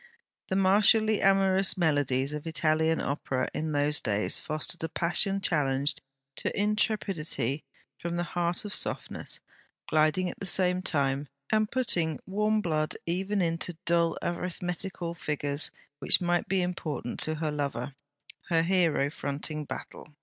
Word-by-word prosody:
The 190 Hz, -, -1 dB
martially 210 Hz, +3 st, +5 dB
amorous 195 Hz, 0 st, +4 dB
melodies 145 Hz, -5 st, +1 dB
of 150 Hz, +2 st, -5 dB
Italian 160 Hz, 0 st, +2 dB
Opera 135 Hz, -2 st, -1 dB
in 155 Hz, 0 st, -2 dB
those 145 Hz, 0 st, +2 dB
days 105 Hz, -1 st, +1 dB
fostered 155 Hz, +2 st, -4 dB
a 160 Hz, -, -1 dB
passion 195 Hz, +5 st, +1 dB
challenged 140 Hz, -5 st, 0 dB, 0.4 s
to -, -, -1 dB
intrepidity 195 Hz, -, 0 dB, 0.4 s
from 170 Hz, 0 st, -3 dB
the 175 Hz, -, 0 dB
heart 175 Hz, +2 st, -2 dB
of 205 Hz, -, -4 dB
softness; -, -, -3 dB, 0.5 s
gliding 155 Hz, +4 st, +3 dB
at -, -, -6 dB
the 195 Hz, -, -4 dB
same 180 Hz, 0 st, +3 dB
time, 140 Hz, -5 st, +1 dB, 0.2 s
and 215 Hz, -1 st, +3 dB
putting 170 Hz, -, 0 dB
warm 210 Hz, +2 st, +1 dB
blood 155 Hz, -4 st, 0 dB
even 190 Hz, +3 st, 0 dB
into 165 Hz, 0 st, -2 dB
dull 170 Hz, -1 st, +2 dB
arithmetical 175 Hz, 0 st, -3 dB
figures 145 Hz, -2 st, -1 dB, 0.3 s
which -, -, +4 dB
might 175 Hz, -1 st, +1 dB
be 190 Hz, -1 st, +1 dB
important 165 Hz, -8 st, -3 dB
to 155 Hz, -, +1 dB
her 155 Hz, -1 st, -2 dB
lover, 140 Hz, -3 st, -3 dB, 0.6 s
her 165 Hz, -2 st, +3 dB
hero 165 Hz, -6 st, +2 dB
fronting 150 Hz, +1 st, -3 dB
battle. 150 Hz, +1 st, -8 dB
170 Hz, 135 wpm, -29 LUFS, 150-190 Hz, 0.6 s, martially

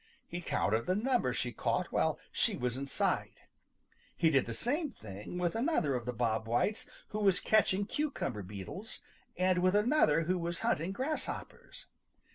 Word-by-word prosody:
He 175 Hz, +1 st, -5 dB
counted 110 Hz, -, 0 dB
the 185 Hz, -, +2 dB
number 240 Hz, -, +2 dB
she 120 Hz, 0 st, -2 dB
caught -, -, -1 dB
while -, -, +2 dB
she -, -, +1 dB
was 125 Hz, -1 st, -1 dB
in 135 Hz, +1 st, -4 dB
sight. -, -, -1 dB, 0.7 s
He 165 Hz, -2 st, +4 dB
did 135 Hz, -5 st, +3 dB
the 115 Hz, -, -3 dB
same 295 Hz, -, 0 dB
thing 105 Hz, -, -8 dB
with 175 Hz, -1 st, 0 dB
another 225 Hz, -, +1 dB
of 125 Hz, -1 st, -3 dB
the -, -, +1 dB
Bob 115 Hz, -2 st, 0 dB
Whites 120 Hz, -, +1 dB, 0.2 s
who 215 Hz, -, -3 dB
was 195 Hz, -3 st, +4 dB
catching 205 Hz, -2 st, +3 dB
cucumber 260 Hz, -, -2 dB
beetles, 100 Hz, -, -6 dB, 0.4 s
and 185 Hz, 0 st, +3 dB
with 185 Hz, +2 st, +3 dB
another 210 Hz, -, +4 dB
who 180 Hz, +3 st, 0 dB
was 170 Hz, -1 st, -3 dB
hunting 165 Hz, +5 st, +1 dB
grasshoppers. 265 Hz, +9 st, -4 dB
175 Hz, 165 wpm, -33 LUFS, -, 0.7 s, He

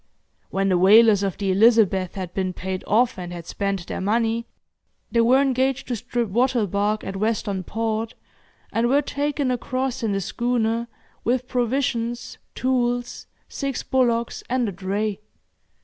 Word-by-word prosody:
When 195 Hz, 0 st, 0 dB
the 180 Hz, -2 st, +3 dB
whalers 210 Hz, +2 st, +6 dB
of 195 Hz, -3 st, -2 dB
the 195 Hz, -2 st, 0 dB
'Elizabeth' 200 Hz, -3 st, +4 dB
had 185 Hz, -3 st, -5 dB
been 185 Hz, -1 st, -1 dB
paid 185 Hz, +1 st, -4 dB
off, 235 Hz, +1 st, +2 dB
and 175 Hz, -1 st, -6 dB
had 170 Hz, -2 st, -7 dB
spent 195 Hz, -2 st, -2 dB
their -, -, -5 dB
money, 225 Hz, +3 st, 0 dB, 0.6 s
they 230 Hz, -, +3 dB
were 250 Hz, +3 st, +5 dB
engaged 265 Hz, -1 st, +1 dB
to 245 Hz, -, 0 dB
strip 240 Hz, 0 st, -2 dB
wattle 240 Hz, +2 st, +2 dB
bark 205 Hz, +2 st, 0 dB
at 195 Hz, -, -5 dB
Western 205 Hz, -2 st, -1 dB
Port, 225 Hz, +2 st, -2 dB, 0.6 s
and 235 Hz, +1 st, +2 dB
were 285 Hz, +3 st, +3 dB
taken 285 Hz, -2 st, -1 dB
across 255 Hz, +1 st, -2 dB
in 225 Hz, -3 st, 0 dB
the 195 Hz, -, 0 dB
schooner, 235 Hz, +2 st, -1 dB, 0.4 s
with 250 Hz, +1 st, 0 dB
provisions, 240 Hz, -1 st, -1 dB, 0.2 s
tools, 245 Hz, -1 st, -1 dB, 0.2 s
six 275 Hz, -2 st, -3 dB
bullocks 235 Hz, -3 st, +1 dB
and 250 Hz, -1 st, +1 dB
a -, -, -2 dB
dray. 195 Hz, +2 st, -2 dB
230 Hz, 150 wpm, -23 LUFS, 195-245 Hz, 0.6 s, whalers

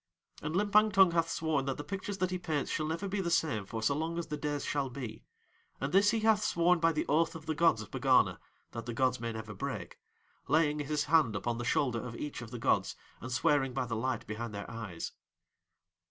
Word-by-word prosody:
And 150 Hz, +2 st, -3 dB
Limpang 210 Hz, +2 st, +4 dB
Tung 190 Hz, -2 st, +6 dB
hath 165 Hz, -1 st, +1 dB
sworn 155 Hz, -5 st, 0 dB
that 135 Hz, -1 st, -2 dB
the 145 Hz, -, -5 dB
pictures 195 Hz, +4 st, -4 dB
that 185 Hz, -1 st, 0 dB
he 185 Hz, -, -2 dB
paints 155 Hz, -5 st, -2 dB
shall 155 Hz, -, -1 dB
never 165 Hz, +5 st, -2 dB
be 195 Hz, +1 st, -1 dB
the 170 Hz, -, -1 dB
same 150 Hz, -, +1 dB
for 110 Hz, +1 st, -4 dB
so 140 Hz, -, +3 dB
long 160 Hz, +3 st, -2 dB
as 170 Hz, -, -2 dB
the 150 Hz, -, -4 dB
days 145 Hz, -1 st, -3 dB
shall 140 Hz, -2 st, -1 dB
be, 120 Hz, -4 st, -7 dB, 0.5 s
and 135 Hz, +2 st, -3 dB
this 200 Hz, +2 st, +6 dB
he 225 Hz, -1 st, +1 dB
hath 215 Hz, -1 st, +3 dB
sworn 175 Hz, -3 st, +3 dB
by 165 Hz, 0 st, +4 dB
the 155 Hz, -, -1 dB
oath 160 Hz, +3 st, +2 dB
of 160 Hz, -1 st, -9 dB
the 160 Hz, -, -1 dB
gods 160 Hz, -8 st, +3 dB
of 100 Hz, -, -14 dB
Pegana -, -, +3 dB, 0.3 s
that 115 Hz, 0 st, -7 dB
the 120 Hz, -, -4 dB
gods 130 Hz, 0 st, +2 dB
may 115 Hz, 0 st, -3 dB
never 110 Hz, -1 st, -6 dB
break, 95 Hz, -, -5 dB, 0.5 s
laying 150 Hz, +1 st, +3 dB
his 145 Hz, 0 st, 0 dB
hand 150 Hz, -8 st, +3 dB
upon 115 Hz, +4 st, -2 dB
the 120 Hz, -, -3 dB
shoulder 125 Hz, -2 st, +1 dB
of 120 Hz, -2 st, -6 dB
each 145 Hz, -2 st, -5 dB
of 120 Hz, -, -8 dB
the 120 Hz, -, -6 dB
gods 115 Hz, -, +1 dB, 0.2 s
and 130 Hz, -, -7 dB
swearing 135 Hz, -1 st, +2 dB
by 130 Hz, -2 st, 0 dB
the 115 Hz, -1 st, -3 dB
light 125 Hz, +1 st, -2 dB
behind 110 Hz, 0 st, -5 dB
Their 100 Hz, -, -6 dB
eyes. 110 Hz, -7 st, -5 dB
150 Hz, 230 wpm, -32 LUFS, 120-165 Hz, 0.5 s, Tung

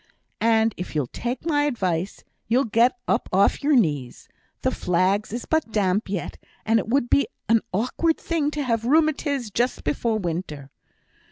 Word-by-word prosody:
And 225 Hz, -1 st, +3 dB
if 180 Hz, -2 st, -6 dB
you'll 150 Hz, -3 st, +1 dB
take 245 Hz, +4 st, -4 dB
my 290 Hz, -3 st, +2 dB
advice, 190 Hz, -, -2 dB, 0.2 s
you'll 245 Hz, +5 st, +2 dB
get 235 Hz, +3 st, +3 dB
up -, -, 0 dB
off 195 Hz, +2 st, +3 dB
your 295 Hz, 0 st, +3 dB
knees. 145 Hz, -, 0 dB, 0.4 s
The -, -, +2 dB
flags 185 Hz, +4 st, 0 dB
is 235 Hz, +2 st, -4 dB
but 315 Hz, -8 st, 0 dB
damp 205 Hz, -1 st, 0 dB
yet, 190 Hz, -3 st, -4 dB, 0.3 s
and 225 Hz, +1 st, +3 dB
it -, -, -5 dB
would 255 Hz, 0 st, +2 dB
be 280 Hz, -1 st, +3 dB, 0.2 s
an 225 Hz, +1 st, +4 dB
awkward 255 Hz, -, 0 dB
thing 320 Hz, -4 st, -1 dB
to 300 Hz, -1 st, -3 dB
have 230 Hz, -4 st, 0 dB
rheumatiz 285 Hz, -4 st, +1 dB
just 245 Hz, +2 st, 0 dB
before 220 Hz, +10 st, 0 dB
winter.' 165 Hz, -7 st, -5 dB
225 Hz, 165 wpm, -24 LUFS, 185-270 Hz, 0.4 s, an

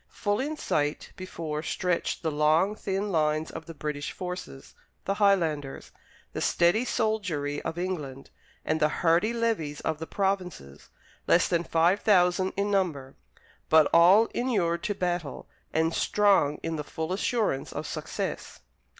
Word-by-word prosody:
Full 205 Hz, -1 st, -1 dB
in 300 Hz, +3 st, -3 dB
sight 145 Hz, -, -1 dB
before 165 Hz, -5 st, -5 dB
stretched 180 Hz, +3 st, -2 dB
the 160 Hz, -, 0 dB
long, 155 Hz, +6 st, +3 dB
thin 200 Hz, 0 st, -3 dB
lines 155 Hz, -1 st, 0 dB
of 160 Hz, 0 st, -8 dB
the 165 Hz, -, -9 dB
British 150 Hz, -1 st, -4 dB
forces 180 Hz, -7 st, -7 dB, 0.3 s
the 195 Hz, -, 0 dB
Highlanders, 165 Hz, -9 st, 0 dB, 0.4 s
the -, -, -4 dB
steady 175 Hz, +8 st, +2 dB
soldiery 180 Hz, -, -1 dB
of 165 Hz, +1 st, -5 dB
England, 150 Hz, -7 st, -5 dB, 0.3 s
and 155 Hz, 0 st, 0 dB
the 155 Hz, 0 st, +3 dB
hardy 170 Hz, +7 st, +2 dB
levies 225 Hz, -11 st, -1 dB
of 160 Hz, -1 st, -2 dB
the 160 Hz, -, -6 dB
provinces 185 Hz, -, -3 dB, 0.4 s
less 170 Hz, -, +4 dB
than 170 Hz, -1 st, 0 dB
five 170 Hz, +4 st, +2 dB
thousand 185 Hz, -2 st, +3 dB
in 200 Hz, +1 st, 0 dB
number, 155 Hz, -9 st, -1 dB, 0.5 s
but 155 Hz, -2 st, +6 dB
all 180 Hz, +7 st, +7 dB
inured 185 Hz, -9 st, 0 dB
to 205 Hz, -, -1 dB
battle, 175 Hz, -6 st, -3 dB, 0.2 s
and 160 Hz, +1 st, +1 dB
strong 195 Hz, -9 st, +2 dB
in 165 Hz, -1 st, -2 dB
the 150 Hz, -, -3 dB
full 160 Hz, +3 st, -4 dB
assurance 205 Hz, -, -1 dB
of -, -, -5 dB
success. -, -, -5 dB
170 Hz, 145 wpm, -27 LUFS, 155-195 Hz, 0.5 s, all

